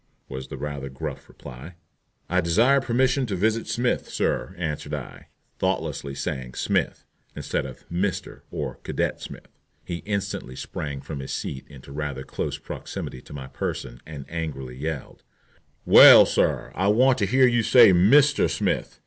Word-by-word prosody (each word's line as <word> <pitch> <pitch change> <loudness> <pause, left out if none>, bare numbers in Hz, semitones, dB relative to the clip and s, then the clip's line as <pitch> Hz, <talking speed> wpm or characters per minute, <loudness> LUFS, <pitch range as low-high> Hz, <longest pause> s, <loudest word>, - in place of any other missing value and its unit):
was 65 0 -7
the - - -8
rather 70 -2 -5
gruff 65 - -7
reply. 65 +8 -11 0.5
"I 90 +1 +1
desire 115 +12 +3
permission 130 +2 +1
to 100 - -2
visit 110 +4 0
Smith, 120 +3 -1
sir," 95 - -2
answered 75 -4 -3
I, - - -9 0.3
thoughtlessly 70 -1 -2
saying 70 -4 -4
"Smith," - - -1 0.3
instead - - -3
of 65 - -13
"Mr" 90 +2 -3
or - - -5
"Cadet - - -2
Smith." - - -11 0.3
He 85 - -4
instantly 100 -9 -4
sprang 70 0 -5
from 70 +1 -7
his 65 - -6
seat 65 - -5
into 70 -1 -13
rather 70 -2 -4
close - - -4
proximity 65 - -7
to - - -13
my 70 -2 -7
person 65 -2 -5
and 75 -3 -9
angrily 75 -6 -5
yelled: 75 0 -5 0.6
"Well, - - +10
sir, - - 0
I 95 +2 0
want 125 +5 +4
to 100 - +1
hear 130 +3 +4
you 120 -2 +3
say 115 -3 +7
'Mr. 135 +12 +5
Smith.' - - -2
85 Hz, 155 wpm, -24 LUFS, 70-110 Hz, 0.6 s, Well